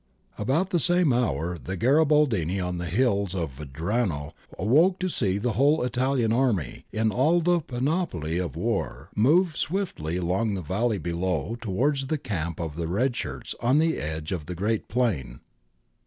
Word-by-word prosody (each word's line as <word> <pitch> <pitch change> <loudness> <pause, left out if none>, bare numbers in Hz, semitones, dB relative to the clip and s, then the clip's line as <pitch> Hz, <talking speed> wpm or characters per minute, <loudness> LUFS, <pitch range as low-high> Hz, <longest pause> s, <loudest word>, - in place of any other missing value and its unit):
^ - - -3
About 155 - +1
the 175 - +2
same 175 -3 +3
hour 85 - 0
the 95 +2 -5
Garibaldini 130 - +3
on 90 -1 -2
the 90 - -3
hills 100 -1 +1
of 80 -7 -3
Vajrano 80 - -2 0.2
awoke 155 - +4
to 185 - -1
see 100 - 0
the 120 +4 -1
whole 140 +6 +3
Italian 125 -2 +1
army, 115 - 0
in 110 0 +1
all 155 +9 +3
the 175 +1 +2
panoply 125 - -2
of 85 -6 -3
war, - - -2
move 155 - +3
swiftly 155 - -2
along 95 +5 0
the 95 - -4
valley 105 +7 0
below 90 +2 -2
towards 135 +6 0
the 155 - 0
camp 85 - -4
of 80 -3 -4
the 85 -1 -2
red 120 +9 0
shirts 65 - -4
on 125 +4 +3
the 160 +1 +2
edge 80 0 -4
of 85 -5 -3
the 90 - -5
great 105 +5 -1
plain. 90 - -1
110 Hz, 170 wpm, -26 LUFS, 85-135 Hz, 0.2 s, awoke